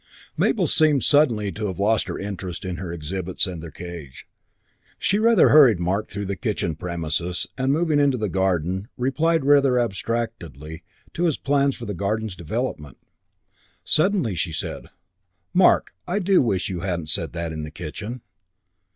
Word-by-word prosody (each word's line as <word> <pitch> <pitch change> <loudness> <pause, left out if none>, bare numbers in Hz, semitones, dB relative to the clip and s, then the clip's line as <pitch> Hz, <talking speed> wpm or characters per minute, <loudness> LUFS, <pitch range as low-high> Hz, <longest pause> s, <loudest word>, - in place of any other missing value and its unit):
Mabel - - +2
seemed 150 -4 +3
suddenly 120 -9 +3
to 105 +3 -3
have 95 - -5
lost 105 +2 +2
her - - -4
interest 95 -2 -6
in 90 -2 -3
her 90 -3 -5
exhibits 85 +4 -2
and 90 -4 -6
their 85 - -8
cage. 85 -7 -9 0.7
She 200 - +1
rather 230 -3 +5
hurried 135 - +7
Mark 95 +5 -1
through 100 0 -4
the 100 0 -3
kitchen 95 -5 -2
premises 85 +1 -3
and, 130 +1 0
moving 155 0 +2
into 140 -3 +3
the 110 -2 -1
garden, 95 0 0
replied 155 +4 +1
rather 140 -3 +5
abstractedly 95 - -4 0.3
to 175 - 0
his 160 -5 +1
plans 140 0 +1
for 120 - -8
the 105 - -4
garden's 100 +2 -2
development. 85 - -4 0.9
Suddenly 155 - +2
she 85 0 -2
said, - - -5 0.7
"Mark, 185 0 +4
I 180 +3 -1
do 195 -1 +3
wish 100 -7 0
you 90 -3 -4
hadn't 85 -4 -3
said 80 -1 -1
that 85 -1 -3
in 80 -1 -5
the 75 - -6
kitchen." 95 +10 -7
100 Hz, 160 wpm, -23 LUFS, 85-135 Hz, 0.9 s, hurried